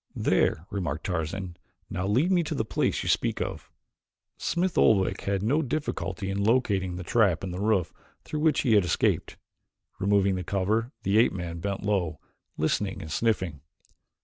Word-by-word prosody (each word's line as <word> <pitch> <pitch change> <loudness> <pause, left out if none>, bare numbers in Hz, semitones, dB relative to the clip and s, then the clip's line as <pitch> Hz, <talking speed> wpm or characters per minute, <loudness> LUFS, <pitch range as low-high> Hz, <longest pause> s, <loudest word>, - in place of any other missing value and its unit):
"There," 80 - +1
remarked 85 -6 -3
Tarzan. 90 +1 -3 0.3
"Now, 90 0 -3
lead 130 - +2
me 180 -2 +4
to 155 - -3
the 110 - -1
place - - 0
you - - -5
speak - - +1
of." - - -4 0.7
Smith 175 +1 -1
Oldwick 95 -4 +3
had 100 -1 0
no 140 +9 +2
difficulty 115 - -3
in 100 +1 -1
locating 100 -6 +1
the 90 - -5
trap 100 -3 +2
in 95 - -3
the 90 - -5
roof 100 -4 +1 0.3
through 155 - -4
which 155 -2 +3
he 120 -5 +2
had 105 -2 +5
escaped. 85 - 0 0.6
Removing 100 0 +3
the 90 -1 -3
cover 105 +6 0
the 100 +3 +3
ape 115 - +4
man 85 -3 -5
bent 100 +2 -3
low, 90 -8 0 0.4
listening 95 +5 0
and 80 - -8
sniffing. 95 -10 0
100 Hz, 170 wpm, -27 LUFS, 90-115 Hz, 0.7 s, had